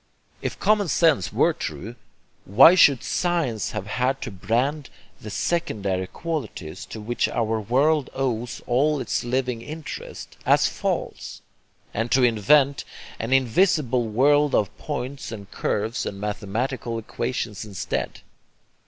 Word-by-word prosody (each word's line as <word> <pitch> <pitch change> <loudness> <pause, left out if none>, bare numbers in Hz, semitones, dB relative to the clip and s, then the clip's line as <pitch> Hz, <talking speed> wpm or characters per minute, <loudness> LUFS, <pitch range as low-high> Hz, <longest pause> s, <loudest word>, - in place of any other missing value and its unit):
If - - -4
common 205 -1 +3
sense 155 - +2
were - - +3
true, 115 +5 -6 0.5
why 105 - +8
should 145 -8 +5
science 165 - -1
have 105 -2 -5
had 125 +5 0
to - - -5
brand 125 +9 -1 0.3
the 105 - -7
secondary 100 - -1
qualities, 140 - -5
to 110 - -8
which 120 +3 -1
our 115 -1 0
world 135 +6 +2
owes 125 -3 -2
all 145 +5 +2
its - - -2
living 125 -1 -1
interest, 155 +4 -8
as - - +4
false, - - -4 0.5
and 115 +3 -1
to 130 - +4
invent 130 +5 +4 0.4
an 115 +3 -3
invisible 130 - +2
world 145 +6 +3
of 105 - 0
points 140 -2 -5
and 100 -3 -9
curves 110 +2 -2
and 100 - -6
mathematical 115 +4 -3
equations 115 -1 -4
instead? 100 -3 -4
125 Hz, 125 wpm, -24 LUFS, 110-145 Hz, 0.5 s, why